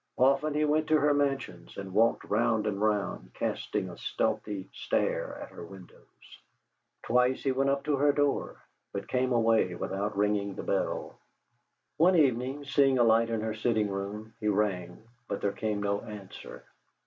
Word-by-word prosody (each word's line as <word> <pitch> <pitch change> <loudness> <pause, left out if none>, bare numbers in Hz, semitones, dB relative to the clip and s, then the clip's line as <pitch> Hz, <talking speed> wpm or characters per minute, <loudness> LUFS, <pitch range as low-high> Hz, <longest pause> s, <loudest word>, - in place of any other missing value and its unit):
Often 140 +3 +3
he 150 0 +2
went 155 +1 +1
to 155 - +4
her 145 0 +3
Mansions, 135 -11 -2
and 95 -1 -6
walked 115 +3 +3
round 110 0 +1
and 100 -2 -2
round 105 -2 -1
casting - - -2
a - - -9
stealthy 100 -3 -2
stare - - -1
at - - -10
her - - -10
windows. 95 +1 -15 0.6
Twice 125 +2 +2
he 135 - +2
went 135 +1 +1
up 140 0 0
to 150 -2 +1
her 145 +1 +4
door, 145 -1 0 0.4
but 100 0 -4
came 130 0 0
away 115 -6 +3
without 100 +3 -3
ringing 100 -1 +1
the - - -6
bell. - - -2 0.8
One 175 +4 +5
evening, 135 -1 +1
seeing 140 -1 +3
a 120 - +5
light 115 0 +4
in 115 -1 -1
her 110 0 -2
sitting 110 -1 0
room, 100 +3 -5
he 105 - -2
rang, 95 -3 -1 0.2
but 100 - -3
there 100 - 0
came 105 -2 -2
no 100 0 0
answer. 105 -3 -10
110 Hz, 170 wpm, -29 LUFS, 100-135 Hz, 0.8 s, One